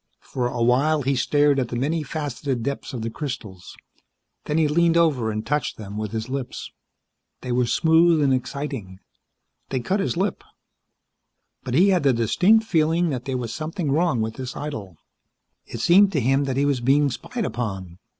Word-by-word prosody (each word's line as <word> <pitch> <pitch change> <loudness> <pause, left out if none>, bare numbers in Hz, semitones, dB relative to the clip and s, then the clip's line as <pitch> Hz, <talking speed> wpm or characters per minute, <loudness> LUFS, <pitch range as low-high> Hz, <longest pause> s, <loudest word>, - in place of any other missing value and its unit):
For 125 -2 -3
awhile 125 +6 +2
he 135 +2 +1
stared 145 +2 +2
at 125 - -1
the 120 - -5
many 150 +7 0
faceted 140 -4 -4
depths 140 +3 -4
of 120 -5 -5
the 115 - -3
crystals; 110 - -7 0.7
then 150 - -1
he 160 -2 +3
leaned 170 +2 +3
over 145 -9 +2
and 110 0 -3
touched 150 -2 -1
them 100 -2 -8
with 105 -1 -4
his 110 0 -4
lips. 130 -1 -5 0.7
They 125 - -5
were 125 0 +1
smooth 160 +2 +4
and 135 -2 +3
exciting. 130 -7 -4 0.7
They 130 - -1
cut 185 +12 -1
his 195 - -1
lip. 190 +1 -1 1.2
But 125 -1 -3
he 185 +6 +5
had 185 -3 +3
the 140 -2 +3
distinct 180 - +3
feeling 165 -2 +1
that 125 -2 -4
there 135 -2 -2
was 120 -2 -4
something 155 0 -3
wrong 155 -5 +1
with 110 0 -3
this 130 -1 -6
idyll. 110 - -6 0.7
It - - -6
seemed 195 +3 +5
to 150 - +2
him 135 +3 +2
that 135 -1 -2
he 140 - +2
was 140 -4 0
being 140 +3 +3
spied 230 - -4
upon. 95 - -5
135 Hz, 180 wpm, -23 LUFS, 120-155 Hz, 1.2 s, he